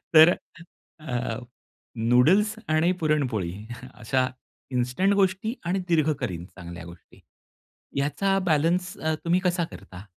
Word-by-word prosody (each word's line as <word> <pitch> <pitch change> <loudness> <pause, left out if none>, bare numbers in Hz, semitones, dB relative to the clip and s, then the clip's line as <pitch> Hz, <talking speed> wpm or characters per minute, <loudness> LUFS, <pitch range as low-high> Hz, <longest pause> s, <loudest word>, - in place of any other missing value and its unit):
तर 160 +3 +9 0.7
अ, 125 -5 -3 0.6
नूडल्स 135 - +4
आणि 155 +3 +3
पुरणपोळी 130 - 0 0.4
अशा 130 +2 0 0.4
इन्स्टंट 125 +11 +1
गोष्टी 195 +3 +1
आणि 185 +3 0
दीर्घकालीन 140 - 0
चांगल्या 85 -2 -10
गोष्टी 85 0 -14 0.8
याचा 150 +8 +1
बॅलन्स 175 +5 +1
अ, 160 0 -1
तुम्ही 175 +2 +3
कसा 180 -2 +1
करता? 90 0 -11
150 Hz, 105 wpm, -26 LUFS, 120-180 Hz, 0.8 s, तर